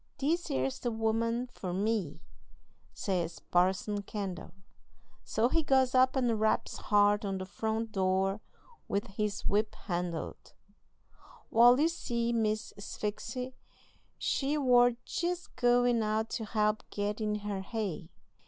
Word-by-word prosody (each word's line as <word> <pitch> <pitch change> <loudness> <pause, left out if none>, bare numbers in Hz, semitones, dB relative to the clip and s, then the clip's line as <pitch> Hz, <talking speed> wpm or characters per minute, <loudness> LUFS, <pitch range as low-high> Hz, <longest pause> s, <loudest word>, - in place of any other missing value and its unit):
"'This 330 +5 0
'ere's 130 0 -1
the 240 - -1
woman 230 +2 0
for 195 -7 -6
me,' 195 -5 -1 0.7
says 175 -4 -2
Parson 190 +3 +1
Kendall. 195 -4 -5 0.7
So 225 +2 +1
he 325 +6 +2
goes 265 -4 +3
up 255 +1 +4
and 240 -4 +1
raps 220 0 +1
hard 205 0 +3
on 195 -1 -2
the 185 - -4
front 220 +3 -2
door 195 +1 +1 0.5
with 200 +1 -1
his 205 +1 -3
whip 210 +1 +1
handle. 175 -2 -3 1.1
Wal, 245 +3 +7
you 310 - +5
see, 235 -8 -1
Miss 215 -1 0
Sphyxy 230 +5 -4 0.6
she 285 +2 0
war 245 -3 +5
jest 355 -1 -3
goin' 245 -1 +3
out 215 +1 -1
to 230 -2 -3
help 215 0 +1
get 205 +1 -2
in 210 -1 0
her 205 -2 -3
hay. 190 -5 -4
215 Hz, 130 wpm, -31 LUFS, 200-245 Hz, 1.1 s, Wal